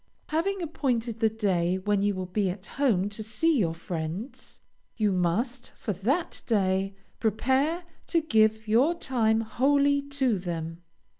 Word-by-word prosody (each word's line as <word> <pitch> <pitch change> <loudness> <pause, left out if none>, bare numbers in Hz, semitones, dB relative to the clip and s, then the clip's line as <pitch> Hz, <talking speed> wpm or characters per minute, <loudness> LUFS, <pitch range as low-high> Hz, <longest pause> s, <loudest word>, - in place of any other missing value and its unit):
Having 355 +4 0
appointed 245 -8 -1
the 220 -1 +4
day 185 -5 +1
when 205 +1 0
you 205 0 +1
will 185 0 -3
be 190 +1 0
at 185 +2 -6
home 230 -9 +1
to 205 +1 -8
see 250 +8 +1
your 165 -5 +1
friends, 180 - -6 0.4
you 210 -3 +2
must, 220 +8 0
for 210 - -3
that 255 - -1
day, 195 -3 +1 0.2
prepare 265 - +1 0.2
to 335 - +3
give 220 -7 +2
your 255 +10 +4
time 225 -8 +1
wholly 280 +5 +2
to 275 -7 0
them. 165 -1 -5
220 Hz, 145 wpm, -27 LUFS, 190-270 Hz, 0.4 s, the